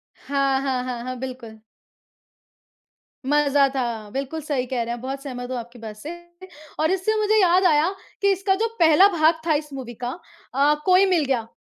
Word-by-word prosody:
हाँ, 275 -1 0
हाँ, 260 -2 -1
हाँ, 245 -2 -5
हाँ। 255 0 -5
बिल्कुल। 250 -4 -8 1.7
मज़ा 285 -1 +3
था, 230 -5 -3
बिल्कुल 275 +6 -4
सही 275 -4 -2
कह 245 -1 -2
रहे 235 +1 -4
हैं 240 - -7
बहुत 270 +2 -5
सहमत 245 -2 -6
हूँ 255 - -2
आपकी 240 +1 -9
बात 220 -2 -8
से, 250 +9 -9 0.7
और 315 +3 +2
इससे 385 +3 0
मुझे 430 0 +3
याद 365 +1 +4
आया 315 +1 +4 0.3
कि 400 0 +4
इसका 385 0 +1
जो 450 +3 0
पहला 330 +4 +7
भाग 320 +1 +3
था 315 - +4
इस 295 -1 -3
मूवी 250 -3 -7
का 245 - -1 0.4
अ, 285 +3 +3
कोई 370 +1 +5
मिल 345 -6 +2
गया। 240 -4 -1
275 Hz, 185 wpm, -23 LUFS, 250-325 Hz, 1.7 s, पहला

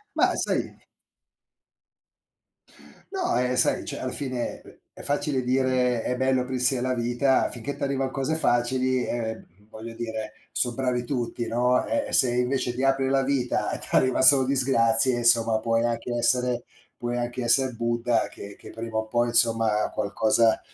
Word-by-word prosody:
Ma - - +3
sai - - -2 2.3
No, 380 - 0
eh, 125 0 0
sai, 125 - +1
cioè - - -5
alla - - -4
fine, 130 -4 -4
è - - -17 0.2
è - - -9
facile 145 -2 -1
dire, 125 -2 +1
"è 125 - -2
bello 130 0 +1
aprirsi 125 +1 0
alla 130 +1 -1
vita": 120 +2 +1
finché 130 +4 -6
t'arrivano 135 -1 -2
cose 135 +3 -2
facili, 130 -2 +1
ehm, 110 -2 -4 0.2
voglio 115 +1 -9
dire, 110 -2 -5 0.2
son 120 -1 -1
bravi 125 -2 -1
tutti, 120 -2 -3
no; 125 +2 +1
eh, 285 -1 -1
e - - -8
se 125 -2 +4
invece 125 0 -1
ti 130 - -3
apri 135 0 +2
alla 135 0 +2
vita 135 -2 -1
e - - -4
t'arriva 130 -1 +1
solo 135 0 +7
disgrazie, 130 -2 +3
insomma 115 -2 +3
puoi 115 +1 0
anche 120 +1 -2
essere 125 0 +1 0.3
puoi 120 0 -3
anche 120 +1 -3
esser 125 +1 +2
Buddha, 120 0 0
che 100 0 -11
che - - -12
prima 115 0 -7
o 110 - -2
poi 120 +2 0
insomma 115 -2 +2
qualcosa 110 +2 +2
125 Hz, 160 wpm, -25 LUFS, 115-130 Hz, 2.3 s, solo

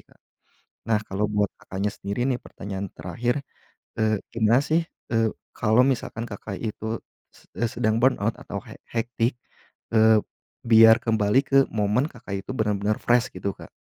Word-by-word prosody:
Kak. - - -25 0.7
Nah 110 -2 +2
kalau 105 0 -2
buat 105 -1 0
Kakaknya 100 +2 -3
sendiri 100 +3 -4
nih 125 - +1
pertanyaan 100 0 -6
terakhir, 120 - -2 0.6
eee, 110 -1 +2 0.2
gimana 115 +2 +4
sih, 165 +2 +2 0.3
eee, 115 -1 +3 0.2
kalau 115 +4 +4
misalkan 120 -3 -2
Kakak 100 -2 -7
itu 110 0 -4 0.3
s - - -22
eee, 115 +4 -1
sedang 115 0 0
burnout 115 -4 +2
atau - - -6
hec - - -12
hectic, 120 +1 -1 0.6
eee, 110 0 +6 0.5
biar 115 0 +8
kembali 110 +2 +3
ke 135 - +1
momen 110 +6 +1
Kakak 100 -5 -6
itu - - -7
benar-benar 105 -1 0
fresh 120 0 +3
gitu, 95 +2 -3
Kak? - - -12
110 Hz, 150 wpm, -25 LUFS, 105-120 Hz, 0.7 s, biar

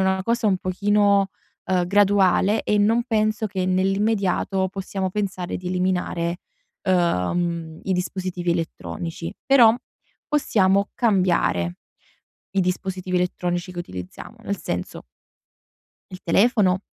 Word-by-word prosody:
una 190 0 +1
cosa 230 -2 +1
un 190 - +2
pochino, 200 +1 +2 0.4
uhm, 180 -2 +1
graduale 200 +1 +3
e 210 - +2
non 225 +3 +3
penso 215 -2 0
che 190 -2 -3
nell'immediato 195 0 +1
possiamo 190 0 -3
pensare 190 -3 -3
di 180 - -9
eliminare, 180 -2 -1 0.5
uhm, 170 - 0
i 190 - -1
dispositivi 180 -1 -2
elettronici. 165 0 -5
Però, 240 -5 +6 0.5
possiamo 200 -9 +2
cambiare 180 - +1 0.8
i 195 - +2
dispositivi 185 0 -2
elettronici 180 0 -2
che 175 - -8
utilizziamo. 90 - -9
Nel 200 -1 -2
senso 90 - -5 1.0
il 185 - -9
telefono, 195 0 +3
190 Hz, 110 wpm, -23 LUFS, 180-205 Hz, 1.0 s, Però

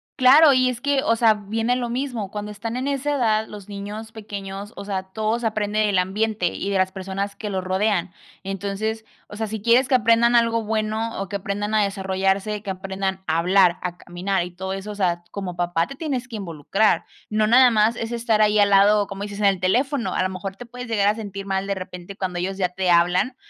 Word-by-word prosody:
Claro, 280 +3 +7
y 255 -1 +3
es 245 -2 -4
que 280 +1 +1
o 230 - +2
sea, 225 -1 +5
viene 225 +4 -1
lo 245 -1 -2
mismo, 240 -5 -3
cuando 210 +1 -5
están 225 +3 -5
en 260 +2 -2
esa 285 +1 -1
edad, 220 -4 +1
los 205 -2 -10
niños 210 +2 -7
pequeños 205 -1 -7
o 200 - -8
sea, 195 -2 -2
todo 220 +2 -1
se 235 - 0
aprende 215 0 -1
en 210 - +2
el 195 - +1
ambiente 200 +1 0
y 200 - -4
de 200 - +1
las 185 0 +1
personas 195 +1 -4
que 210 - -5
lo 190 -1 -2
rodean, 185 -1 0 0.3
entonces 200 +3 -3 0.2
o 205 - -10
sea, 220 0 -3
si 220 0 -4
quieres 240 +3 +4
que 270 - +3
aprendan 235 0 +4
algo 230 -1 +3
bueno 220 +1 -2
o 195 -1 -4
que 200 - -2
aprendan 205 +2 -3
a 215 - +4
desarrollarse, 195 +1 -1
que 205 - -7
aprendan 190 0 -3
a 160 -1 +1
hablar, 180 0 +4
a 180 0 -4
caminar 180 +2 -2
y 180 - -9
todo 190 +2 -5
eso, 195 +2 -6
o - - -7
sea, 175 -3 0
como 190 -3 -5
papá, 175 -1 0
te 275 - -9
tienes 270 -5 -3
que 235 - -8
involucrar. 195 +3 0 0.3
No, 215 0 +2
nada 250 +1 +6
más 220 +1 +3
es 230 0 -4
estar 230 -2 +1
ahí 210 0 +3
al 205 - +5
lado, 200 +1 +5
como 200 0 -6
dices, 205 0 -6
en 210 - +1
el 195 -2 +3
teléfono, 250 +8 0
a - - 0
lo 185 - 0
mejor 190 +1 -6
te 245 - -10
puedes 250 +1 -8
llegar 205 -3 +1
a 210 - +3
sentir 200 -3 -7
mal 195 0 -1
de 200 - -1
repente 185 0 -8
cuando 185 -3 -3
ellos 190 +2 -3
ya 185 -2 +1
te 180 0 0
hablan, 180 +9 +3
205 Hz, 235 wpm, -23 LUFS, 190-225 Hz, 0.3 s, Claro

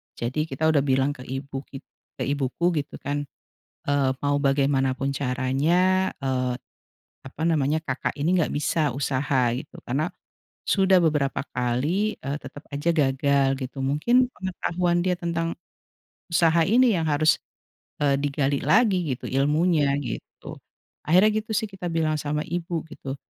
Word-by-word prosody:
Jadi 135 +7 -2
kita 160 - -5
udah 150 - +3
bilang 135 0 +2
ke 130 -3 -10
ibu 135 +1 -5
kit 135 0 -10 0.3
ke - - -3
ibuku 140 +5 0
gitu 145 0 -6
kan, 145 +1 -2 0.6
eee, 140 -2 +2
"Mau 145 0 +1
bagaimanapun 135 -1 +1
caranya, 145 +9 +1
eee, 130 -2 -1 0.7
apa 140 +3 -7
namanya, 155 -2 +2
kakak 135 -4 -3
ini 160 +6 +1
nggak 165 - +1
bisa 150 +1 +1
usaha 135 -2 +1
gitu, 135 +4 -8
karena 150 +7 -1 0.6
sudah 190 -1 +4
beberapa 150 -4 +1
kali, 140 - 0
eee, 140 +2 -4
tetep 145 +3 -10
aja 145 +4 -2
gagal 140 -1 +2
gitu, 130 +1 -6
mungkin 235 - +3
pengetahuan 180 -1 -1
dia 185 -1 +2
tentang 170 -1 -1 0.8
usaha 165 0 +4
ini 245 +2 +5
yang 165 - 0
harus, 155 +1 +3 0.6
eee, 145 -1 +3
digali 140 -1 0
lagi 215 -3 +4 0.2
gitu, - - -11
ilmunya 150 +2 +2
gitu." 125 -5 -7 0.5
Akhirnya 185 +7 +5
gitu 215 - -28
sih 220 +1 +1
kita 185 -3 -5
bilang 160 -1 +1
sama 150 +1 -1
ibu 170 -1 -3
gitu, 140 -3 -7
145 Hz, 140 wpm, -25 LUFS, 135-170 Hz, 0.8 s, ini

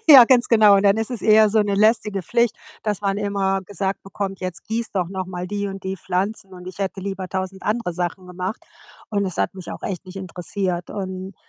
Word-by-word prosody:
Ja, 270 -5 +12
ganz 245 0 +4
genau, 210 -3 +7
dann 200 +1 +4
ist 225 +1 -1
es 240 -4 -4
eher 215 0 +6
so 215 0 +4
‘ne 205 -1 0
lästige 210 -1 +2
Pflicht, 235 +5 +1 0.3
dass 210 -3 -1
man 200 -1 0
immer 200 -1 0
gesagt 195 0 -3
bekommt: 195 0 -5
„Jetzt 185 -2 -5
gieß 230 +1 -2
doch 180 -4 0
noch 185 -1 -4
mal 180 -1 -5
die 205 +1 -2
und 195 -1 -7
die 190 0 -2
Pflanzen“ 195 +2 -2
und 180 0 -11
ich 185 - -8
hätte 195 0 -2
lieber 195 -1 -4
1.000 190 0 -4
andere 215 -4 -1
Sachen 180 +1 -3
gemacht. 180 +4 -5 0.5
Und 200 -2 +1
es 185 - -4
hat - - 0
mich 185 -2 -8
auch - - -7
echt 190 0 -4
nicht 185 0 -11
interessiert. 180 -1 -3
Und, 190 -1 -5
195 Hz, 220 wpm, -22 LUFS, 185-210 Hz, 0.5 s, Ja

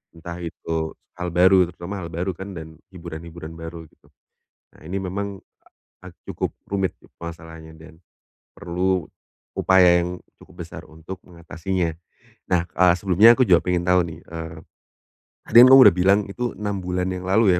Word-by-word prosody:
Entah 85 +1 -8
itu 80 -1 -4 0.2
hal 90 0 -3
baru, 90 +1 +5
terutama 90 +4 -7
hal 85 - -7
baru 90 +3 -2
dan 85 -5 -9 0.2
hiburan-hiburan 85 -1 -9
baru 80 0 -8
gitu. - - -29 0.7
Nah, - - -21
ini 95 +3 -3
memang 100 +1 -5 0.2
a - - -24 0.4
ag - - -24
cukup - - -3 0.2
rumit 95 -3 -1
itu - - -21
permasalahnya 80 -1 -10
dan 80 0 -15 0.6
perlu 90 -1 -2 0.5
upaya 90 -2 +5
yang 90 +1 -6 0.2
cukup - - -11
besar - - -10
untuk 80 +4 -10
mengatasinya. 85 0 -3 0.6
Nah, 90 -2 +2
eee, 90 0 +3
sebelumnya 100 +5 +6
aku 130 - +4
juga 85 -2 +6
pengen 90 -1 0
tahu 90 0 +4
nih, 80 - -9
eee, 80 -1 -8 0.9
tadi - - -8
kamu 130 - +7
kan 135 - +10
udah 100 -7 +7
bilang 95 +3 +4
itu 120 +3 -3
6 105 -1 -3
bulan 90 0 -2
yang 90 0 -5
lalu 95 -1 +4
ya, - - 0
90 Hz, 165 wpm, -22 LUFS, 85-95 Hz, 0.9 s, kan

